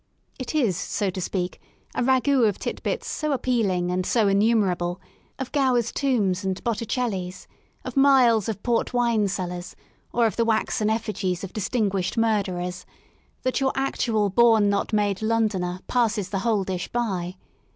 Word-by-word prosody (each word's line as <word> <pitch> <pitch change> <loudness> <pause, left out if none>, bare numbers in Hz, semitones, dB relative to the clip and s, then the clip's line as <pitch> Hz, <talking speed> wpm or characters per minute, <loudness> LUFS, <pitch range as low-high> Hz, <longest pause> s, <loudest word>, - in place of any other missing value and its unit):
It 255 +4 -5
is, 235 - +2
so 195 +1 -1
to 185 - -5
speak, 180 0 -3 0.3
a - - -1
ragoiit 260 -1 +3
of 200 - -4
tit - - -5
bits - - -2
so 305 -2 -1
appealing 205 -9 0
and 185 0 0
so 220 +2 +2
innumerable 195 -4 +2 0.2
— - - -37
of 265 -1 -5
Gower's 255 -5 +2
tombs 210 -9 0
and 190 -1 -2
Botticelli's, 210 -5 -2 0.4
of - - -6
miles 255 -6 +5
of 205 -2 -5
port 240 0 0
wine 235 -4 +2
cellars 180 -2 -4 0.4
or 235 -1 +2
of 220 - -1
the 230 - +3
waxen 220 -1 +1
effigies 210 -5 -2
of 195 - -7
distinguished 200 -2 -1
murderers 185 -5 0 0.3
— - - -38
that 255 - 0
your 265 0 +2
actual 225 -6 0
born 220 -1 +5
not 200 +3 -1
made 205 -2 +1
Londoner 210 -5 0
passes 225 -5 0
the 195 -1 -2
whole 215 -2 +1
dish 185 -2 -3
by. 190 -7 -2
215 Hz, 160 wpm, -24 LUFS, 185-240 Hz, 0.4 s, miles